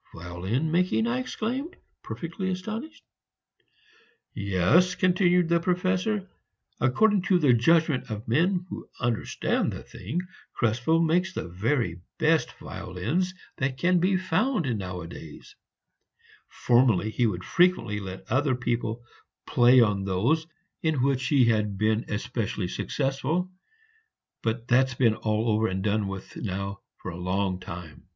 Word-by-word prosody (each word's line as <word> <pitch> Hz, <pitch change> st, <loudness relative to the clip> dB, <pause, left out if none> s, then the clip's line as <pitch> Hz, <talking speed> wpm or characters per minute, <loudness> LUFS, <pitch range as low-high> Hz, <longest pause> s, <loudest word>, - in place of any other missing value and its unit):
"Violin 95 Hz, -, -2 dB
making!" 180 Hz, +6 st, +2 dB
I 240 Hz, +2 st, 0 dB
exclaimed, 255 Hz, +5 st, -3 dB, 0.3 s
perfectly 170 Hz, +3 st, -5 dB
astonished. 220 Hz, -, -5 dB, 1.3 s
"Yes," 100 Hz, -, +2 dB
continued 180 Hz, -1 st, +3 dB
the 170 Hz, 0 st, +4 dB
Professor, 185 Hz, +3 st, 0 dB, 0.5 s
"according 200 Hz, -, +3 dB
to 185 Hz, 0 st, +4 dB
the 145 Hz, -7 st, +4 dB
judgment 155 Hz, +3 st, +3 dB
of 110 Hz, 0 st, -6 dB
men 175 Hz, -, +2 dB
who -, -, -7 dB
understand 120 Hz, -2 st, 0 dB
the -, -, -7 dB
thing, 135 Hz, -, -4 dB, 0.3 s
Krespel 120 Hz, +8 st, +1 dB
makes 175 Hz, +3 st, +1 dB
the -, -, -3 dB
very 95 Hz, -, -1 dB, 0.2 s
best 160 Hz, -4 st, +2 dB
violins 170 Hz, -, -3 dB, 0.2 s
that 130 Hz, 0 st, -1 dB
can 180 Hz, +5 st, +3 dB
be 185 Hz, +2 st, +2 dB
found 185 Hz, -, 0 dB
nowadays; 90 Hz, -5 st, -8 dB, 0.9 s
formerly 120 Hz, -5 st, +2 dB
he 120 Hz, +1 st, +2 dB
would 95 Hz, -4 st, -3 dB
frequently 175 Hz, -, +2 dB
let 95 Hz, -1 st, -8 dB
other 130 Hz, +1 st, +2 dB
people 120 Hz, -1 st, -2 dB, 0.4 s
play 125 Hz, +1 st, +5 dB
on 105 Hz, -4 st, +2 dB
those 120 Hz, -, +1 dB, 0.3 s
in 155 Hz, -6 st, +1 dB
which 130 Hz, -2 st, +1 dB
he 135 Hz, -3 st, +4 dB
had 105 Hz, -3 st, +1 dB
been 110 Hz, +2 st, +1 dB
especially 105 Hz, -3 st, -3 dB
successful, 145 Hz, +6 st, -1 dB, 0.9 s
but 115 Hz, +1 st, -2 dB
that's 130 Hz, 0 st, +3 dB
been 120 Hz, -3 st, +3 dB
all 110 Hz, +1 st, -1 dB
over 110 Hz, +1 st, +2 dB
and 95 Hz, -1 st, -3 dB
done 105 Hz, 0 st, +1 dB
with 95 Hz, -1 st, -7 dB
now 100 Hz, -1 st, -4 dB, 0.2 s
for 95 Hz, -, -6 dB
a 85 Hz, -, -8 dB
long 95 Hz, 0 st, -1 dB
time. 85 Hz, -3 st, -9 dB
125 Hz, 130 wpm, -26 LUFS, -, 1.3 s, play